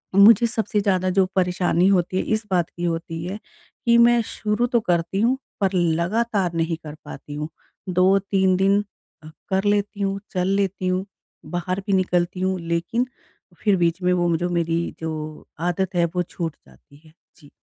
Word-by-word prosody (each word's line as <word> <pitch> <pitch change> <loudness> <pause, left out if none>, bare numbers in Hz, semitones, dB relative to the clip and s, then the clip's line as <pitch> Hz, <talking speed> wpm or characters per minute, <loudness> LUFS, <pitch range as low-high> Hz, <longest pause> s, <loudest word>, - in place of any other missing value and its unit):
मुझे 225 +4 +7
सबसे 220 -2 -1
ज़्यादा 185 -2 +1
जो 190 0 +3
परेशानी 180 -1 +2
होती 185 -1 +1
है - - +1
इस 215 0 0
बात 175 -2 +1
की 175 - -8
होती 165 -1 -3
है 190 +4 -4 0.5
कि 235 0 +5
मैं 235 0 +6
शुरू 215 +3 -1
तो 235 - +4
करती 175 +1 0
हूँ 250 +3 +3 0.2
पर 195 0 +2
लगातार 180 +3 +1
नहीं 165 0 0
कर 150 0 -8
पाती 145 +1 -9
हूँ। 150 +1 -4 0.4
2-3 190 +1 +3
अ, - - +2
दिन 195 +2 +3 0.7
कर 190 +1 +1
लेती 205 0 0
हूँ, 195 0 -1
चल 185 -1 0
लेती 195 -1 0
हूँ, 185 +1 0 0.4
बाहर 180 +2 -3
भी 200 - +1
निकलती 180 -1 +1
हूँ 190 -1 0
लेकिन 170 +9 -1 0.6
फिर 205 -2 +4
बीच 170 +2 +1
में 180 0 +3
वो 175 -1 +1
म 165 - +2
जो 175 +1 -2
मेरी 170 -1 -1
जो 155 -1 -5 0.2
आदत 190 +1 -2
है 170 -1 +3
वो 180 - +1
छूट 165 -3 -5
जाती 65 - -20
है। 155 - -19 0.3
जी। 145 - -18
185 Hz, 180 wpm, -23 LUFS, 170-200 Hz, 0.7 s, मुझे